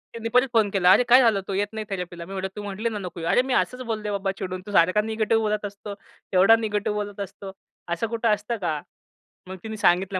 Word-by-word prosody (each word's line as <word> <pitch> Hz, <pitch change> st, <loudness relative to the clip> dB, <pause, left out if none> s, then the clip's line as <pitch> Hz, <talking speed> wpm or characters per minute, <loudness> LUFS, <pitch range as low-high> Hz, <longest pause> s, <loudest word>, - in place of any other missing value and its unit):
तिने 230 Hz, 0 st, -4 dB
परत 250 Hz, +3 st, +3 dB
फोन 220 Hz, -3 st, +3 dB
केला. 185 Hz, -2 st, +4 dB
"अरे, -, -, +4 dB
काय 255 Hz, +2 st, +8 dB
झालं, 220 Hz, -5 st, +3 dB
तू 195 Hz, -, -3 dB
येत 200 Hz, +2 st, 0 dB
नाही 220 Hz, -1 st, -4 dB
थेरपीला" 180 Hz, -3 st, -5 dB
मी 195 Hz, -, -9 dB
म्हणलं 190 Hz, 0 st, -3 dB
"तू 210 Hz, -, -6 dB
म्हटली 205 Hz, +3 st, -3 dB
ना, 215 Hz, -, -5 dB
नको 180 Hz, -3 st, -7 dB
येऊ." 165 Hz, 0 st, -3 dB
"अरे, -, -, +4 dB
मी 260 Hz, 0 st, -2 dB
असंच 250 Hz, 0 st, 0 dB
बोलले 215 Hz, -1 st, -3 dB
बाबा 195 Hz, -1 st, -1 dB
चिडून, 185 Hz, -1 st, -4 dB
तू 205 Hz, -, -8 dB
सारखा 185 Hz, +3 st, +4 dB
निगेटिव्ह 220 Hz, +1 st, 0 dB
बोलत 210 Hz, -1 st, -1 dB
असतो. 200 Hz, 0 st, -7 dB, 0.4 s
तेवढा 190 Hz, +5 st, +7 dB
निगेटिव्ह 210 Hz, -1 st, -2 dB
बोलत 205 Hz, 0 st, -10 dB
असतो. 195 Hz, 0 st, -7 dB, 0.4 s
असं 170 Hz, +7 st, -2 dB
कुठं 230 Hz, 0 st, +1 dB
असतं 210 Hz, +3 st, -5 dB
का?" 155 Hz, -4 st, -1 dB, 0.7 s
मग 190 Hz, 0 st, -7 dB
तिनी 220 Hz, -1 st, -6 dB
सांगितलं 190 Hz, -1 st, +2 dB
205 Hz, 235 wpm, -24 LUFS, 190-220 Hz, 0.7 s, काय